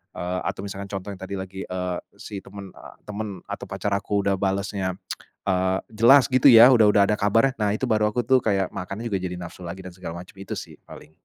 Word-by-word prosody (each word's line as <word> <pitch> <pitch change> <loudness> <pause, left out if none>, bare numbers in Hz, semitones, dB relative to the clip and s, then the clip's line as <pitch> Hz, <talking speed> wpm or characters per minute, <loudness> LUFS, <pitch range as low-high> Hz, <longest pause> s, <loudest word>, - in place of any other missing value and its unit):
eee, 90 +1 -3
atau - - -3
misalkan 100 0 -6
contoh 95 0 -5
yang 95 - -12
tadi 95 +1 -5
lagi, 95 0 -6
eee, 90 -1 -3 0.2
si 100 -2 -8
temen, 100 -1 -11
eee, - - -13
temen 105 +1 -5 0.2
atau - - -7
pacar 105 - -3
aku 100 0 0
udah 100 -1 0
balesnya, 95 -1 -1 0.5
eee, 95 -1 +1 0.2
jelas 120 +5 +6
gitu 130 +2 +5
ya, 120 +1 +9
udah 115 -4 +6
udah 105 -1 +5
ada - - +3
kabarnya 115 +6 +3
nah, 105 -1 +1
itu 110 - -7
baru 110 -3 +2
aku 120 +3 -1
tuh 130 +2 +4
kayak 95 -4 0
makan 100 +4 -6
juga 105 -5 -1
jadi 90 -1 -4
nafsu 90 0 -9
lagi 95 +3 -7
dan 95 - -8
segala 90 -2 -7
macam 90 - -18
itu 95 - -6
sih - - -9
paling. 75 - -13
100 Hz, 225 wpm, -24 LUFS, 95-105 Hz, 0.5 s, ya